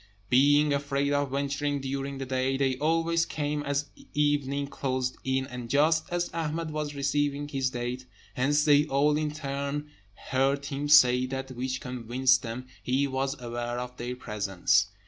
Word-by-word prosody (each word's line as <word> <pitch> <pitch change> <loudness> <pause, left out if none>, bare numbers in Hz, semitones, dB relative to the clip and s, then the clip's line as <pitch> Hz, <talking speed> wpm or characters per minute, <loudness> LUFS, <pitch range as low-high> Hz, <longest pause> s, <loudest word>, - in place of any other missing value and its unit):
Being 145 +3 +5
afraid 140 0 0
of 145 -1 +1
venturing 140 +1 -1
during 135 +1 -4
the 135 - -4
day, 130 +1 0
they 135 -1 +1
always 165 +2 +2
came 150 -2 -2
as 145 0 -2 0.2
evening 145 -1 +1
closed 130 -2 -2
in, 130 0 0
and 125 -3 -7
just 155 +4 +3
as 175 0 0
Ahmed 160 0 -2
was 150 -1 -3
receiving 145 +1 0
his 135 -3 -1
date, 125 +1 -4 0.3
hence 145 +3 +2
they 145 -1 +5
all 145 +1 +3
in 155 0 0
turn 145 0 -4 0.4
heard 135 +2 +1
him 140 +1 -3
say 125 -3 +6
that 135 0 -5
which 130 +1 -3
convinced 125 +1 +1
them 120 +2 -6 0.2
he 130 +3 +1
was 135 +1 -2
aware 120 0 -4
of 125 0 -6
their 125 +1 -4
presence. 105 -3 +1
140 Hz, 160 wpm, -28 LUFS, 130-145 Hz, 0.4 s, say